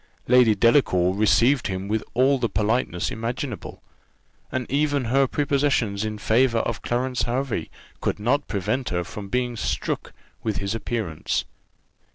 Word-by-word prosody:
Lady 125 Hz, -3 st, +5 dB
Delacour 95 Hz, -5 st, +3 dB
received 115 Hz, +6 st, +3 dB
him 95 Hz, 0 st, -4 dB
with 110 Hz, +1 st, -1 dB
all 135 Hz, +2 st, +4 dB
the 115 Hz, -, 0 dB
politeness 105 Hz, -3 st, 0 dB
imaginable; 120 Hz, +1 st, -5 dB, 0.7 s
and 130 Hz, -1 st, -2 dB
even 145 Hz, -1 st, +1 dB
her 135 Hz, +3 st, +3 dB
prepossessions 140 Hz, -8 st, +1 dB
in 110 Hz, -1 st, -3 dB
favour 115 Hz, +3 st, +2 dB
of 115 Hz, 0 st, -1 dB
Clarence 125 Hz, +1 st, -1 dB
Hervey 125 Hz, +1 st, -2 dB, 0.3 s
could -, -, -1 dB
not 135 Hz, +7 st, +1 dB
prevent 105 Hz, +6 st, -1 dB
her 90 Hz, 0 st, -1 dB
from 100 Hz, +2 st, -8 dB
being 125 Hz, +1 st, -1 dB
struck -, -, -2 dB, 0.3 s
with 110 Hz, -3 st, -2 dB
his 100 Hz, +2 st, -2 dB
appearance. 110 Hz, -8 st, -2 dB
115 Hz, 140 wpm, -24 LUFS, 105-130 Hz, 0.7 s, Lady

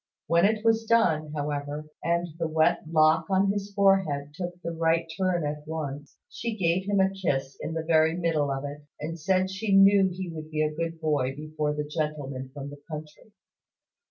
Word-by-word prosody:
When 170 Hz, +3 st, +4 dB
it 215 Hz, +1 st, +1 dB
was 225 Hz, 0 st, +3 dB
done, 165 Hz, -10 st, +2 dB
however, 145 Hz, 0 st, -3 dB, 0.2 s
and 170 Hz, +1 st, +1 dB
the 165 Hz, -, 0 dB
wet 160 Hz, 0 st, +2 dB
lock 160 Hz, 0 st, +4 dB
on 195 Hz, +1 st, +3 dB
his 205 Hz, 0 st, -4 dB
forehead 190 Hz, -8 st, +2 dB
took 175 Hz, +1 st, -6 dB
the 170 Hz, -, -2 dB
right 165 Hz, 0 st, +1 dB
turn 185 Hz, -4 st, 0 dB
at 150 Hz, 0 st, -4 dB
once, 145 Hz, -2 st, -5 dB
she 230 Hz, -1 st, -5 dB
gave 180 Hz, 0 st, +1 dB
him 200 Hz, -1 st, +2 dB
a 190 Hz, 0 st, +3 dB
kiss 140 Hz, -8 st, -2 dB
in 160 Hz, -, -4 dB
the 160 Hz, -, -2 dB
very 160 Hz, 0 st, +3 dB
middle 160 Hz, -5 st, +1 dB
of 135 Hz, 0 st, -2 dB
it, 145 Hz, +1 st, -7 dB, 0.2 s
and 165 Hz, +3 st, -5 dB
said 185 Hz, +3 st, +1 dB
she 200 Hz, +1 st, 0 dB
knew 195 Hz, 0 st, +6 dB
he 185 Hz, +1 st, -5 dB
would 155 Hz, -1 st, -8 dB
be 155 Hz, 0 st, 0 dB
a 155 Hz, 0 st, -1 dB
good 165 Hz, +1 st, -3 dB
boy 145 Hz, -5 st, 0 dB
before 150 Hz, 0 st, -3 dB
the 150 Hz, -, -2 dB
gentleman 145 Hz, -4 st, -3 dB
from 140 Hz, 0 st, -7 dB
the 145 Hz, 0 st, -12 dB
country. 155 Hz, +6 st, -9 dB
160 Hz, 190 wpm, -27 LUFS, 150-190 Hz, 0.2 s, knew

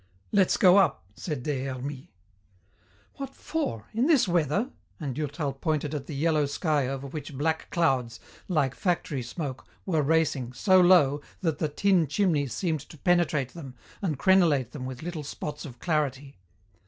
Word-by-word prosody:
"Let's 195 Hz, -3 st, +3 dB
go 185 Hz, 0 st, +6 dB
up," 165 Hz, -, +3 dB
said 150 Hz, -7 st, -4 dB
Des 135 Hz, -3 st, -2 dB
Hermies. 135 Hz, +1 st, -5 dB, 1.1 s
"What 275 Hz, -1 st, -6 dB
for! 115 Hz, -, -3 dB
In 235 Hz, +5 st, +2 dB
this 300 Hz, -10 st, +4 dB
weather?" 175 Hz, -, +1 dB, 0.3 s
and 145 Hz, -5 st, -3 dB
Durtal 145 Hz, 0 st, -3 dB
pointed 150 Hz, +1 st, -2 dB
at 140 Hz, -2 st, -4 dB
the 150 Hz, -, -6 dB
yellow 155 Hz, 0 st, +2 dB
sky 145 Hz, -2 st, 0 dB
over 135 Hz, +1 st, -4 dB
which 145 Hz, 0 st, -7 dB
black 160 Hz, +2 st, -1 dB
clouds, 130 Hz, -9 st, +1 dB, 0.3 s
like 150 Hz, -8 st, +1 dB
factory 165 Hz, -6 st, -1 dB
smoke, 130 Hz, +2 st, -6 dB, 0.2 s
were 165 Hz, -5 st, +1 dB
racing, 145 Hz, -5 st, +1 dB
so 185 Hz, +7 st, +4 dB
low 150 Hz, -6 st, +5 dB, 0.2 s
that 160 Hz, -5 st, -1 dB
the 155 Hz, -, 0 dB
tin 180 Hz, +1 st, +2 dB
chimneys 150 Hz, -, +1 dB
seemed 160 Hz, -, -1 dB
to 160 Hz, -, -12 dB
penetrate 160 Hz, -5 st, +2 dB
them 135 Hz, -6 st, -10 dB, 0.3 s
and 165 Hz, -8 st, -1 dB
crenelate 160 Hz, -, +3 dB
them 130 Hz, -3 st, -6 dB
with 130 Hz, +2 st, -7 dB
little 170 Hz, -3 st, -4 dB
spots 150 Hz, +1 st, -6 dB
of 125 Hz, -5 st, -9 dB
clarity. 140 Hz, -, -2 dB
150 Hz, 160 wpm, -27 LUFS, 135-175 Hz, 1.1 s, go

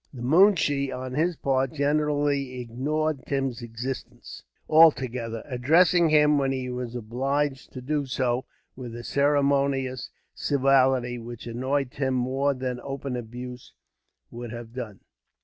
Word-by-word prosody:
The 125 Hz, -4 st, -8 dB
moonshee, 150 Hz, -3 st, +4 dB
on 130 Hz, 0 st, -5 dB
his 165 Hz, +5 st, +1 dB
part, 135 Hz, -1 st, 0 dB
generally 145 Hz, -3 st, 0 dB
ignored 140 Hz, +5 st, -2 dB
Tim's 135 Hz, -3 st, -2 dB
existence 120 Hz, +3 st, -7 dB, 0.3 s
altogether; 125 Hz, -8 st, +3 dB
addressing 160 Hz, +6 st, +4 dB
him, 150 Hz, -1 st, +5 dB
when 135 Hz, -1 st, +1 dB, 0.4 s
obliged 135 Hz, +4 st, -2 dB
to 130 Hz, -, -7 dB
do 145 Hz, +1 st, -1 dB
so, 125 Hz, -1 st, -1 dB, 0.3 s
with 125 Hz, -3 st, -8 dB
a 120 Hz, -, -7 dB
ceremonious 140 Hz, -2 st, +1 dB, 0.2 s
civility 130 Hz, -3 st, +2 dB
which 120 Hz, 0 st, -9 dB
annoyed 130 Hz, +3 st, -1 dB
Tim 130 Hz, -2 st, -1 dB
more 135 Hz, +3 st, 0 dB
than 125 Hz, -1 st, -3 dB
open 135 Hz, -1 st, -5 dB
abuse 125 Hz, +1 st, -8 dB, 0.6 s
would 120 Hz, -1 st, -7 dB
have 120 Hz, -1 st, -8 dB
done. 115 Hz, -6 st, -7 dB
135 Hz, 120 wpm, -26 LUFS, 125-145 Hz, 0.6 s, him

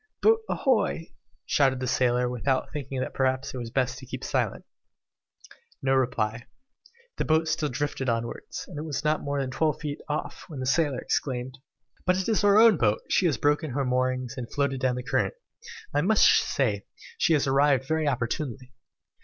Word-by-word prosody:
"Boat 450 Hz, +1 st, +6 dB
ahoy!" 220 Hz, -, 0 dB, 0.3 s
shouted 135 Hz, -2 st, +2 dB
the 130 Hz, -, -2 dB
sailor, 125 Hz, -1 st, +2 dB
without 125 Hz, +2 st, -1 dB
thinking 135 Hz, -3 st, -4 dB
that -, -, -4 dB
perhaps 130 Hz, 0 st, 0 dB
it -, -, -5 dB
would 120 Hz, -, -4 dB
be -, -, -7 dB
best 125 Hz, 0 st, -1 dB
to 130 Hz, -, -12 dB
keep -, -, -6 dB
silence. -, -, -1 dB, 1.2 s
No 135 Hz, 0 st, +2 dB
reply. 120 Hz, -3 st, 0 dB, 0.7 s
The -, -, -1 dB
boat 160 Hz, +1 st, +2 dB
still 155 Hz, -1 st, 0 dB
drifted 135 Hz, 0 st, -2 dB
onwards, 115 Hz, 0 st, -4 dB
and 160 Hz, -6 st, -7 dB
it -, -, -4 dB
was 150 Hz, -2 st, -3 dB
not 155 Hz, 0 st, +1 dB
more 140 Hz, 0 st, -2 dB
than 135 Hz, -1 st, -2 dB
twelve 155 Hz, +3 st, 0 dB
feet 145 Hz, -2 st, -5 dB
off, 150 Hz, -, -4 dB
when 150 Hz, -5 st, -8 dB
the 130 Hz, -, -3 dB
sailor 145 Hz, 0 st, +2 dB
exclaimed 130 Hz, 0 st, -2 dB, 0.4 s
"But 185 Hz, 0 st, +2 dB
it 190 Hz, -, -2 dB
is 220 Hz, -3 st, +1 dB
our 205 Hz, 0 st, +5 dB
own 225 Hz, -4 st, +7 dB
boat! 110 Hz, -5 st, +2 dB
she 185 Hz, -, +3 dB
has 155 Hz, -, 0 dB
broken 150 Hz, +2 st, +1 dB
her 140 Hz, 0 st, 0 dB
moorings, 130 Hz, 0 st, 0 dB
and 120 Hz, -2 st, -6 dB
floated 140 Hz, -2 st, 0 dB
down 130 Hz, -1 st, +1 dB
the 125 Hz, -, -4 dB
current. 135 Hz, -, 0 dB, 0.6 s
I 145 Hz, -, +2 dB
must 205 Hz, +5 st, +4 dB
say 105 Hz, -8 st, +2 dB, 0.3 s
she 165 Hz, -, +3 dB
has 145 Hz, -, +2 dB
arrived 135 Hz, -1 st, +3 dB
very 160 Hz, 0 st, 0 dB
opportunely." 130 Hz, 0 st, -3 dB
135 Hz, 185 wpm, -27 LUFS, 125-155 Hz, 1.2 s, own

